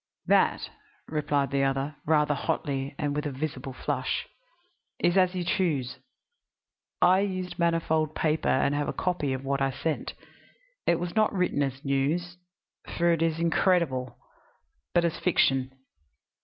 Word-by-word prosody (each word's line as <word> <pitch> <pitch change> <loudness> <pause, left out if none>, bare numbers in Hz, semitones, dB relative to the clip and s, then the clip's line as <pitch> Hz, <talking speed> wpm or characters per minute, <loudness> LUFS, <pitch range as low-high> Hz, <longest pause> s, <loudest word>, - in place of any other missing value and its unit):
"That," - - +3 0.4
replied 145 -3 0
the 140 0 +1
other, 135 +2 -1
rather 150 -1 +3
hotly 140 -2 -2
and 145 -1 -1
with 150 0 -1
a - - -3
visible 135 -1 -4
flush, 130 - -2 0.7
"is 175 - +2
as 185 -1 +3
you 180 - -1
choose. 145 -8 -1 1.0
I 185 +1 +6
used 185 -3 -3
manifold 160 -2 +1
paper 155 0 +1
and 140 +2 +2
have 145 0 -1
a - - -2
copy 175 -6 -1
of 130 +1 -3
what 140 0 -1
I 135 - +2
sent. 155 +4 -3 0.7
It 170 - +3
was 175 0 -4
not 215 -1 +3
written 180 -6 0
as 135 0 -3
news, 155 +6 0 0.6
for 170 0 +3
it 165 - -1
is 165 -1 +1
incredible, 165 -7 +1 0.8
but 170 0 +4
as 170 -1 -1
fiction. 135 -7 +2
155 Hz, 145 wpm, -27 LUFS, 135-175 Hz, 1.0 s, I